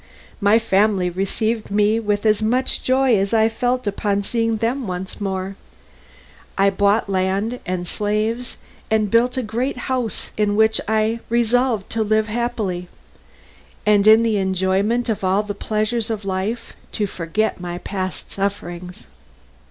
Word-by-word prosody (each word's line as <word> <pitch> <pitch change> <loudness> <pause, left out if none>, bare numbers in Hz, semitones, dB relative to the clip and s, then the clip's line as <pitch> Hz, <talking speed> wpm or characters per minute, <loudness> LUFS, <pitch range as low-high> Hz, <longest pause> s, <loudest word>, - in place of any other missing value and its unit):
My 205 +1 +5
family 200 -4 +2
received 215 +5 -1
me 210 +2 +2
with 205 -1 -1
as 215 -1 +3
much 250 +4 +1
joy 260 -1 +3
as 195 +3 0
I 220 0 +5
felt 245 +2 -1
upon 200 0 0
seeing 225 +1 0
them 235 +3 -1
once 185 +2 -5
more. 190 0 -3 1.0
I 195 0 +4
bought 205 +3 +2
land 195 +5 0
and 180 -1 -2
slaves, 215 +5 -1 0.3
and 215 -2 +1
built 245 +2 +3
a 255 - 0
great 240 +5 -2
house 250 -3 -3
in 210 -1 +1
which 220 +1 +3
I 220 +1 +1
resolved 235 -2 +1
to 225 - -1
live 215 0 +1
happily, 215 -6 -2 1.0
and 210 -1 +4
in 220 +1 +8
the 225 -2 +1
enjoyment 190 +5 +1
of 220 -4 -2
all 190 +3 +2
the 205 -1 -4
pleasures 215 +3 -1
of 215 -3 -3
life 200 +5 -3 0.2
to 210 - 0
forget 185 +3 -2
my 175 -1 -4
past 185 0 -5
sufferings. 180 -3 -4
215 Hz, 145 wpm, -21 LUFS, 195-230 Hz, 1.0 s, in